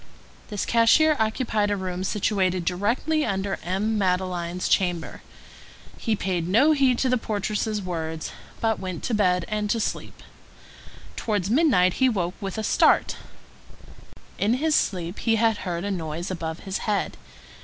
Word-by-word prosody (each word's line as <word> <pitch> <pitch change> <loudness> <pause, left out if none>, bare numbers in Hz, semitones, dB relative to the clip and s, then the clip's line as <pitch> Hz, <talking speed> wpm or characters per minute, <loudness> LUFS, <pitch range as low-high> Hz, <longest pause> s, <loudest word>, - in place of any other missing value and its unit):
This 205 -3 -2
cashier 270 +7 +4
occupied 220 -1 0
a 205 - 0
room 185 -1 -4
situated 185 -3 0
directly 230 - 0
under 195 -3 -2
M. 210 +5 -1
Madeleine's 180 -2 -1
chamber. 175 -3 0 0.8
He 225 -2 0
paid 180 -4 -2
no 240 - +5
heed 270 -4 +3
to 260 - +1
the 255 -1 +2
portress's 210 0 -2
words, 160 -3 -4 0.3
but 225 -1 0
went 185 -3 -5
to 245 - -2
bed 180 -4 +2
and 210 -2 -2
to 230 - +1
sleep. - - -4 0.9
Towards 205 -3 -1
midnight 230 - +4
he 260 - +6
woke 180 -6 -1
up - - -25
with 195 0 -4
a 220 - -2
start; - - +3 1.2
in 215 +4 +2
his 310 +4 +1
sleep 180 - 0
he 225 -1 +2
had 225 -1 +2
heard 175 -2 -4
a 205 - -2
noise 170 0 -4
above 165 -2 -4
his 190 -1 -3
head. 205 -2 0
200 Hz, 155 wpm, -25 LUFS, 180-225 Hz, 1.2 s, he